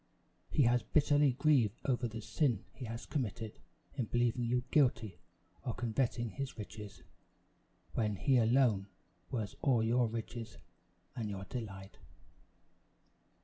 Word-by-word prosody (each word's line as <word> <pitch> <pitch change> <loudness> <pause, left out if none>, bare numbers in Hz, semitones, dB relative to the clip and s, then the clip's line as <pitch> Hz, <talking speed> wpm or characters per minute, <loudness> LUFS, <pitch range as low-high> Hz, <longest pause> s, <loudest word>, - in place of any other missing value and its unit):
He 145 - +3
has 120 0 +4
bitterly 145 -2 +3
grieved 125 -6 +3
over 125 -2 +1
the 115 0 -6
sin 120 - 0
he 130 - -7
has 115 +1 -6
committed 115 -6 -3 0.3
in 125 - -1
believing 120 +1 +1
you 125 +1 +1
guilty 115 -8 +2 0.4
of 120 - -3
coveting 120 -1 0
his 135 +4 -5
riches, 105 -1 -8 0.9
when 105 -3 0
he 130 +6 +3
alone 115 -4 +3 0.4
was 110 -7 -3
all 125 -5 +3
your 120 +1 +3
riches 115 0 -5 0.6
and 115 -4 -3
your 100 -1 -5
delight. 100 -3 -7
120 Hz, 125 wpm, -34 LUFS, 110-130 Hz, 0.9 s, has